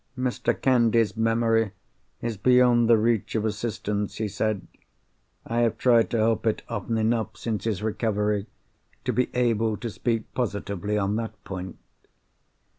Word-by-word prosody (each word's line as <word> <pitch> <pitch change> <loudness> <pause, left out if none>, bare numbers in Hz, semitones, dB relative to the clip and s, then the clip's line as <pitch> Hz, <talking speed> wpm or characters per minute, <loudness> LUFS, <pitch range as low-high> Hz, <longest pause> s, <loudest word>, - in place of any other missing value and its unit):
"Mr. 125 -1 -1
Candy's 115 -4 +3
memory 115 -1 +2 0.5
is 115 -1 -2
beyond 120 +1 +4
the 115 - +7
reach 115 -1 0
of 110 -1 0
assistance," 105 -1 -2
he 110 - -2
said. 105 0 -2 0.8
"I 115 +1 -1
have 115 -2 +2
tried 120 -3 +4
to 115 - -1
help 115 +1 +1
it 110 - 0
often 115 0 -2
enough 110 0 0
since 110 -4 -3
his 105 -3 -1
recovery, 105 -1 0 0.6
to - - 0
be 125 - +1
able 115 -3 +1
to 115 - -5
speak 115 0 -2
positively 100 -3 -2
on 105 +1 0
that 110 -2 -5
point." 95 -1 -6
110 Hz, 145 wpm, -25 LUFS, 105-115 Hz, 0.8 s, the